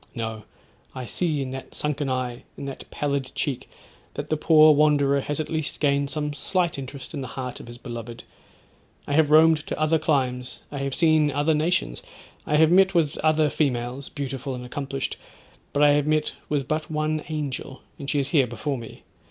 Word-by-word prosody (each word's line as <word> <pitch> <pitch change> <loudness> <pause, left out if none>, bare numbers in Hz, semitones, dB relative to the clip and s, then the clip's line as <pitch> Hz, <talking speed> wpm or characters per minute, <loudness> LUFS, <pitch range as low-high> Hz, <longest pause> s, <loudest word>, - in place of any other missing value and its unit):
No! 110 -2 -4 0.5
I 130 -1 -5
see 155 -1 -1
in 130 - -5
that 135 0 -8
sunken 150 -1 -1
eye, 125 -2 -2
in - - -6
that 135 -1 -7
pallid 140 -2 -2
cheek, 135 -4 -2 0.5
that - - -5
the - - +4
poor 155 0 +6
wanderer 145 -2 +4
has 145 +2 -2
at 155 - -1
least 160 -2 -3
gained 140 -1 +2
some 150 +1 -2
slight 175 +1 -1
interest 135 0 -7
in 145 - -3
the 130 - -5
heart 125 +1 -5
of - - -11
his 120 0 -9
beloved. 120 -1 -7 0.8
I 145 - -3
have 155 0 +4
roamed 160 +1 +7
to - - -3
other 155 +1 +3
climes, 130 -5 -1
I 140 - -4
have 140 -1 -2
seen 155 -3 +4
other 145 +3 +1
nations; 150 - 0 0.5
I 150 - +2
have 160 +1 +5
met 190 +1 +5
with 155 -4 +2
other 155 0 +3
females, 130 -2 -1
beautiful 135 -2 -4
and 125 0 -7
accomplished, 135 +1 -4 0.5
but 145 - +2
I 145 - +7
have 145 0 +2
met 155 0 +1 0.2
with 140 -4 0
but 155 0 -2
one 155 0 -1
angel, 145 -3 -4 0.2
and 140 - -5
she - - 0
is 140 -1 0
here 140 -5 +4
before 135 +3 -3
me. 115 - -11
145 Hz, 195 wpm, -25 LUFS, 130-155 Hz, 0.8 s, roamed